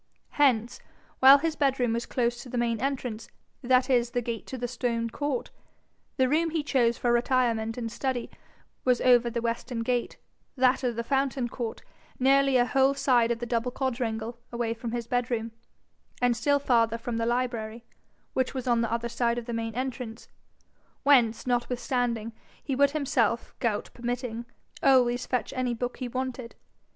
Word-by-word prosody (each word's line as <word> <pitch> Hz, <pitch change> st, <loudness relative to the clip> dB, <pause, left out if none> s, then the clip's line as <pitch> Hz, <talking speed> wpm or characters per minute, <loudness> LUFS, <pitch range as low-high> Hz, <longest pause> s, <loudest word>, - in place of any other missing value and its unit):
Hence, 245 Hz, -5 st, +2 dB, 0.4 s
while 270 Hz, +2 st, +9 dB
his 320 Hz, +2 st, -1 dB
bedroom 265 Hz, -5 st, +1 dB
was 235 Hz, +1 st, -2 dB
close 240 Hz, -1 st, -1 dB
to 250 Hz, -, -11 dB
the 245 Hz, -, -4 dB
main 235 Hz, -2 st, 0 dB
entrance, 255 Hz, -5 st, -3 dB, 0.3 s
that 255 Hz, 0 st, +3 dB
is 245 Hz, -3 st, +2 dB
the 245 Hz, 0 st, -1 dB
gate 230 Hz, -1 st, -5 dB
to 260 Hz, -, -5 dB
the 245 Hz, 0 st, -3 dB
stone 235 Hz, -1 st, -2 dB
court, 285 Hz, 0 st, -3 dB, 0.7 s
the 260 Hz, -2 st, +3 dB
room 320 Hz, +5 st, +2 dB
he 320 Hz, -1 st, -1 dB
chose 240 Hz, -5 st, +2 dB
for 240 Hz, -1 st, +1 dB
retirement 235 Hz, -2 st, +1 dB
and 230 Hz, -2 st, -4 dB
study 255 Hz, 0 st, -3 dB, 0.5 s
was 250 Hz, -2 st, +3 dB
over 245 Hz, -1 st, +5 dB
the 235 Hz, 0 st, -3 dB
western 235 Hz, +1 st, -2 dB
gate, 245 Hz, 0 st, -1 dB, 0.4 s
that 260 Hz, 0 st, +3 dB
of 245 Hz, -2 st, 0 dB
the 235 Hz, -, -2 dB
fountain 270 Hz, -1 st, 0 dB
court, 235 Hz, -2 st, -5 dB, 0.3 s
nearly 270 Hz, 0 st, +4 dB
a 245 Hz, -, +4 dB
whole 270 Hz, +2 st, +3 dB
side 245 Hz, -4 st, +3 dB
of 235 Hz, -, 0 dB
the 240 Hz, -, -5 dB
double 235 Hz, +1 st, -1 dB
quadrangle 235 Hz, -3 st, -3 dB
away 235 Hz, -1 st, -1 dB
from 230 Hz, 0 st, -6 dB
his 240 Hz, 0 st, -3 dB
bedroom, 235 Hz, -1 st, -1 dB, 0.7 s
and 245 Hz, -1 st, +2 dB
still 285 Hz, +5 st, +2 dB
farther 230 Hz, -5 st, +2 dB
from 235 Hz, 0 st, -4 dB
the 230 Hz, 0 st, 0 dB
library, 235 Hz, -2 st, -2 dB, 0.5 s
which 260 Hz, +1 st, -1 dB
was 260 Hz, -, -3 dB
on 240 Hz, -2 st, +2 dB
the 230 Hz, -1 st, -1 dB
other 235 Hz, 0 st, -1 dB
side 235 Hz, 0 st, 0 dB
of 240 Hz, -, -4 dB
the 235 Hz, -, -5 dB
main 225 Hz, -1 st, -3 dB
entrance 250 Hz, -3 st, -5 dB, 0.8 s
whence, 240 Hz, -6 st, +4 dB
notwithstanding, 245 Hz, -2 st, -1 dB, 0.3 s
he 275 Hz, -, -2 dB
would 280 Hz, +1 st, +4 dB
himself, 265 Hz, -6 st, 0 dB
gout 220 Hz, -4 st, -1 dB
permitting, 240 Hz, -1 st, -4 dB, 0.4 s
always 245 Hz, -2 st, +3 dB
fetch 250 Hz, -, -1 dB
any 250 Hz, -2 st, -1 dB
book 245 Hz, +1 st, -4 dB
he 255 Hz, -, -4 dB
wanted. 255 Hz, -1 st, -4 dB
245 Hz, 170 wpm, -27 LUFS, 235-260 Hz, 0.8 s, while